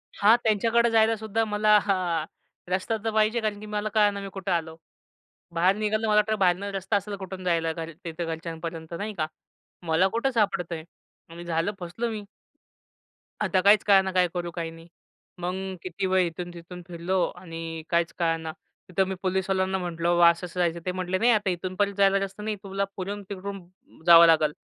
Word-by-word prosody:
हां, 215 +3 +6
त्यांच्याकडे 230 +2 +3
जायलासुद्धा 220 0 +2
मला 210 0 +4
हां 180 -5 0 0.5
रस्ता 190 +4 0
तर 225 - 0
पाहिजे. 220 +2 +2
कारण 210 -1 -2
की 215 - -9
मला 210 0 -2
कळंना 205 -2 +3
मी 195 - -6
कुठं 195 -1 -4
आलो? 160 -2 -1 0.8
बाहेर 180 +3 +3
निघालं 215 +1 0
मला 210 0 +5
तर 215 - +1
बाहेरनं 190 0 +1
रस्ता 195 +2 -2
असेल 200 +1 -2
कुठून 190 -1 -7
जायला 165 -2 +1
घर 165 0 -6
तिथं 170 0 -4
घरच्यांपर्यंत. 165 0 -6
नाही 210 +1 -4
का? 155 -1 0 0.6
मला 165 +4 +4
कुठं 235 +6 0
सापडतंय 180 -7 0 0.5
आणि 170 +1 -9
झालं 165 +4 0
फसलो 190 +7 -3
मी. 215 -2 -5 1.2
आता 185 -2 +2
काहीच 205 +1 +6
कळना 190 -1 +5
काय 180 -1 +3
करू 175 -1 -3
काय 165 -1 -4
नाही. 165 +1 -13 0.5
मग 180 +1 -2 0.3
किती 185 +1 -4
वेळ 185 -1 +3
इथून-तिथून 175 +1 -8
फिरलो 175 +2 -1 0.2
आणि 165 -2 -7
काहीच 170 0 +1
कळना. 165 -1 0 0.4
तिथं 190 +1 +1
मी 190 - -3
पोलिसवाल्यांना 190 0 0
म्हटलं, 170 -1 -2
"बाबा 175 -1 +6
असं 170 +2 -1
असं 180 +1 -7
जायचंय." 170 -1 0
ते 180 - 0
म्हटले, 185 0 -2
"नाही! 240 +4 +4
आता 210 -3 +2
इथूनपण 185 +3 -1
जायला 195 0 +4
रस्ता 195 +1 -5
नाही. 215 -1 -2
तुला 195 0 -2
पुढून 200 +2 -5
तिकडून 200 0 -5 0.5
जावं 170 -1 +9
लागल. 155 -2 +4
185 Hz, 175 wpm, -26 LUFS, 170-205 Hz, 1.2 s, जावं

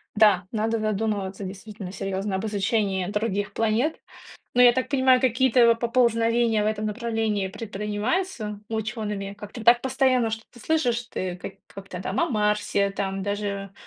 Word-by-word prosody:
Да, 205 -4 +4
надо 225 0 0
задумываться 210 -2 -2
действительно 195 0 -7
серьёзно 195 0 -3
об 190 - -2
изучении 200 -2 0
других 205 -1 -2
планет. 225 +8 0 0.6
Но 250 - +6
я 245 - +8
так 255 +1 -1
понимаю, 260 -2 +4
какие-то 245 -2 +4
поползновения 230 -1 +2
в - - 0
этом 215 0 -1
направлении 220 -3 -1
предпринимаются 210 - -3
учёными? 215 -3 -3
Как-то 210 +2 -8
так 240 0 +6
постоянно 260 -3 +2
что-то 225 +2 -8
слышишь, 245 -5 +1
ты 180 -1 -3
к 180 - -11
как-то 195 -2 -8
там 190 - -1
о 340 - +2
Марсе 210 -2 +1
там 195 -1 -3
даже 200 -1 -3
215 Hz, 145 wpm, -25 LUFS, 200-235 Hz, 0.6 s, я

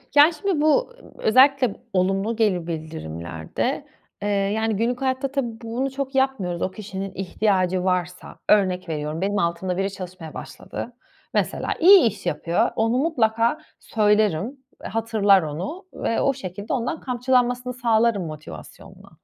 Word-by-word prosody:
Yani, 295 +3 +7
şimdi 325 0 -1
bu, 310 +12 +3
ııı, - - -18
özellikle 260 0 +4
b - - -19 0.2
olumlu 195 +4 +1
geri 195 -7 +1
bildirimlerde, 85 - -4 0.3
eee, 205 - -2
yani, 205 +2 0
günlük 240 +4 -1
hayatta 265 0 -1
tabii 240 -5 -3
bunu 240 +4 -2
çok 270 0 -4
yapmıyoruz. 240 -11 0
O 185 - -1
kişinin 195 -2 -6
ihtiyacı 185 -1 0
varsa, 180 -1 -2
örnek 185 -4 +3
veriyorum, 155 +1 -3
benim 200 +1 0
altımda 175 0 -1
biri 195 +1 0
çalışmaya 185 -4 -8
başladı. 245 - -7 0.4
Mesela, - - 0
iyi 375 +3 +9
iş 215 -3 -5
yapıyor. 175 -1 +1
Onu 225 +2 +1
mutlaka 235 -4 +2 0.2
söylerim. 210 - +1 0.3
Eee, - - -5
hatırlar 220 -4 +3
onu 175 - -5
ve 230 - -1
o 275 - +2
şekilde 200 -4 -6
ondan 255 +4 -2
kamçılanmasını 250 0 0
sağlarım 230 -5 +2
motivasyonla. 155 -1 -10
215 Hz, 140 wpm, -23 LUFS, 185-250 Hz, 0.4 s, iyi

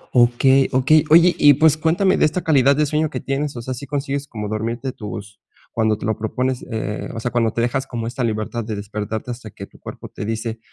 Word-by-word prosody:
Okey, 125 +3 +4
okey. 140 +5 +4
Oye 170 +2 +7
y 145 -1 +7
pues 155 +1 +4
cuéntame 170 +5 +2
de - - +4
esta 165 +4 -1
calidad 140 -3 +4
de 150 +1 +2
sueño 155 +2 0
que - - -4
tienes. 140 +1 -3
O 120 - -6
sea, 130 - -4
¿sí 135 +3 -8
consigues 140 -1 -3
como 105 -5 -5
dormirte 115 +5 -3
tus 105 -2 -8 0.3
cuando 110 -2 +1
te - - -7
lo 110 0 0
propones? 125 +4 -2
Eh, 110 -2 -4
o - - -3
sea, 120 +2 -3
cuando 115 -2 +1
te 115 - -2
dejas 130 +3 -1
como 115 -3 -4
esta 120 +2 -3
libertad 110 +1 -2
de 110 0 -4
despertarte 105 +3 -5
hasta 120 -2 -8
que - - -9
tu - - -21
cuerpo - - -9
te - - -7
dice, 110 +1 -3
125 Hz, 230 wpm, -20 LUFS, 110-140 Hz, 0.3 s, Oye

